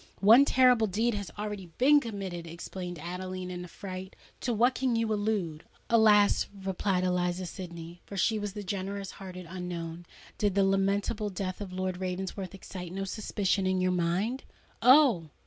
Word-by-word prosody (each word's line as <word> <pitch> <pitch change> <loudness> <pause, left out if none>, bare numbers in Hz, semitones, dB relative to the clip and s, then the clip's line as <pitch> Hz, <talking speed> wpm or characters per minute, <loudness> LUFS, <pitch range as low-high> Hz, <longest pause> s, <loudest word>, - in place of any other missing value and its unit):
"One 230 +7 +8
terrible 250 -5 +5
deed 225 +5 +1
has 200 -4 -4
already 205 -3 -4
been 290 +4 +6
committed!" 195 -8 -5
exclaimed 175 +1 -6
Adeline, 180 +2 -5
in 180 0 -5
affright: 185 +1 -8 0.2
"to 245 - -1
what 240 +3 +3
can 255 -2 0
you 225 -1 +1
allude!" 205 -7 -1 0.3
"Alas!" 210 -3 +5 0.2
replied 190 -1 0
Eliza 180 0 0
Sydney,—for 175 +1 -8
she 220 +3 +2
was 205 -2 -4
the 205 -1 -6
generous 195 0 -4
hearted 185 -2 -9
unknown,—"did 175 +2 -5
the 200 - +4
lamentable 200 +2 +1
death 185 0 -4
of 195 -3 -6
Lord 185 0 -2
Ravensworth 185 +1 -4
excite 180 -2 -8
no 195 +1 -3
suspicions 195 -1 -1
in 185 0 +1
your 185 0 +2
mind?" 180 +9 0 0.4
"Oh! 250 - +6
190 Hz, 150 wpm, -29 LUFS, 180-210 Hz, 0.4 s, One